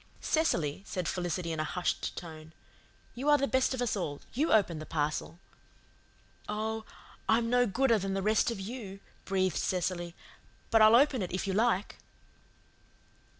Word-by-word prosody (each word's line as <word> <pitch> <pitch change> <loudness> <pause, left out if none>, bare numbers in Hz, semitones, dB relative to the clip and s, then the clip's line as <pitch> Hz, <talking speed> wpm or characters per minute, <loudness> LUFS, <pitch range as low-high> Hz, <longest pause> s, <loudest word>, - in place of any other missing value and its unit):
"Cecily," 170 - 0
said 180 -3 -4
Felicity 175 -1 -2
in 160 - -3
a - - +1
hushed 175 +3 -2
tone. 160 -2 -9 0.6
"You 270 +5 -2
are 295 - +7
the 275 - +1
best 260 0 +2
of 250 - -1
us 235 - 0
all. 150 -7 -3
YOU 295 +7 +1
open 180 -7 +3
the 155 - -7
parcel." 155 +1 -2 1.1
"Oh, 220 +1 -2 0.4
I'm 230 +1 +3
no 245 0 +4
gooder 230 +2 +2
than 195 0 -2
the 195 - -1
rest 215 +3 +3
of 230 -4 -4
you," 200 -1 -7 0.3
breathed 185 -3 0
Cecily, 175 -1 -2 0.6
"but 225 - +5
I'll 215 +1 +8
open 265 -1 +4
it 180 - -3
if 185 - -2
you 195 - -1
like." 215 -1 +1
195 Hz, 160 wpm, -30 LUFS, 175-235 Hz, 1.1 s, I'll